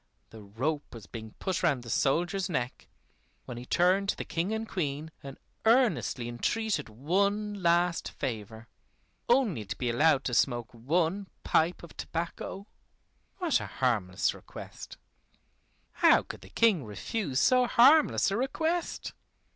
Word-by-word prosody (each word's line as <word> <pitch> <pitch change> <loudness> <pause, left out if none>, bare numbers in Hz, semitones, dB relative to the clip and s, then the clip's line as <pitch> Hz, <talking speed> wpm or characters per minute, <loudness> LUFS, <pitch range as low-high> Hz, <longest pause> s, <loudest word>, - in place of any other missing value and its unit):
The 110 - -11
rope 130 +9 -3
was 110 -3 -10
being 110 -2 -9
put 190 -2 -2
round 130 -4 +1
the 115 - -9
soldier's 175 +7 +1
neck, 125 -7 -3 0.6
when 120 - -7
he 125 +1 -8
turned 185 +3 +2
to - - +1
the - - -6
King 170 +5 -2
and 220 0 -2
Queen 155 -4 -3
and 135 -1 -9 0.3
earnestly 220 - +2
entreated 150 - -1
one 200 - 0
last 170 0 +2
favor 110 -3 -6 0.6
only 235 - +2
to 100 - -5
be 125 -2 -1
allowed 140 +2 +3
to 125 - -3
smoke 120 -2 +1
one 165 - 0 0.2
pipe 165 +3 +1
of 170 - -12
tobacco. 170 +3 -5 0.7
What 350 -6 +1
a - - -6
harmless 105 -8 0
request! - - -10 0.9
How - - +5
could - - -9
the - - -13
King 215 -10 +3
refuse 130 - -3
so 250 - +4
harmless 275 -2 +5
a 200 - 0
request? 320 +7 -2
165 Hz, 140 wpm, -29 LUFS, 120-200 Hz, 0.9 s, How